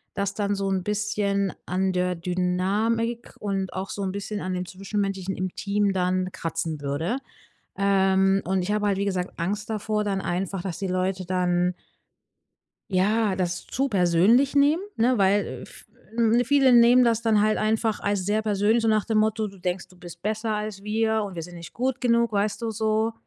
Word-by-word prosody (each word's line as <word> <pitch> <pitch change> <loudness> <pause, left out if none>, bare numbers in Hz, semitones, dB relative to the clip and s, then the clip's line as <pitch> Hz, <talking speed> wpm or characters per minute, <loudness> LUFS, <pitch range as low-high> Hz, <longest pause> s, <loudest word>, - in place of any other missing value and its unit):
dass 200 0 -1
dann 205 0 -1
so 195 0 -2
'n 190 -1 0
bisschen 205 -1 -1
an 185 +1 0
der 180 0 0
Dynamik 195 +7 -1
und 195 -2 -2
auch 190 +1 -4
so 205 - -5
'n 190 - -1
bisschen 200 +1 -4
an 185 0 -3
dem 180 0 -3
Zwischenmenschlichen 195 0 -3
im 185 -1 -3
Team 200 0 0
dann 185 0 0
kratzen 165 -3 -4
würde. 145 - -1 0.6
Ähm, 195 0 +3
und 190 0 +1
ich 190 +4 -2
habe 210 0 0
halt, 195 -1 0
wie 200 - 0
gesagt, 185 -2 -3
Angst 205 +5 -3
davor 215 0 -1
dann 195 -2 -1
einfach, 190 0 -2
dass 180 -3 -5
die 195 - -3
Leute 185 +1 -1
dann 180 0 +1 1.2
ja, 200 +2 +2
das 175 -1 -2
zu 270 +2 -1
persönlich 200 +8 +3
nehmen, 290 +5 +4
ne? 245 +3 +3
Weil 200 +1 +3 0.2
äh, - - -9
v - - -14 0.6
äh, - - +1
viele 270 0 +4
nehmen 240 +1 +7
das 230 -1 +2
dann 220 -2 +3
halt 215 +1 +2
einfach 220 0 0
alles 200 -2 -1
sehr 215 +1 +1
persönlich, 215 +2 +2
so 225 - +1
nach 215 -1 +2
dem 220 -2 +1
Motto: 220 0 +1
„Du 195 -1 -14
denkst, 180 0 -3
du 185 0 -20
bist 175 -1 -11
besser 215 +1 -1
als 210 -2 -4
wir 220 +1 +1
und 200 -2 -5
wir 165 - -5
sind 175 +2 -10
nicht 170 0 -10
gut 260 +2 -2
genug.“ 235 -2 +2
Weißt 205 +2 0
du? 230 - -1
So 220 +1 0
200 Hz, 195 wpm, -25 LUFS, 185-220 Hz, 1.2 s, nehmen